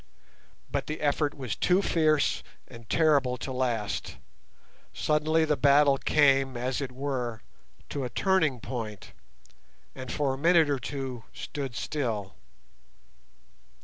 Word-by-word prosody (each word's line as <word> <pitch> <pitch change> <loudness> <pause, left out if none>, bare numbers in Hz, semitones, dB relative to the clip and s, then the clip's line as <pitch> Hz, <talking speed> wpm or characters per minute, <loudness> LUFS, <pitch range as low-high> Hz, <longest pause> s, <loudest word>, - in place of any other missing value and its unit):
But - - -2
the 155 - -4
effort 145 0 0
was 130 -6 -4
too 185 +2 +2
fierce 155 -4 +2 0.3
and 115 -2 -13
terrible 140 -6 +3
to 130 - -6
last. 120 -5 -2 0.8
Suddenly 155 +1 +2
the 150 -1 +2
battle 140 0 +4
came, 135 -4 +3
as 125 +3 -2
it 135 -2 -4
were, 125 -4 -3 0.5
to 140 - -3
a 125 - -3
turning 160 - +1
point, 110 -6 -6 0.8
and 130 -1 -7
for 140 -3 0
a 135 - -6
minute 165 -1 +4
or 140 - 0
two 130 -2 -5
stood 135 -4 -5
still. 110 -7 -3
135 Hz, 125 wpm, -28 LUFS, 125-150 Hz, 0.8 s, battle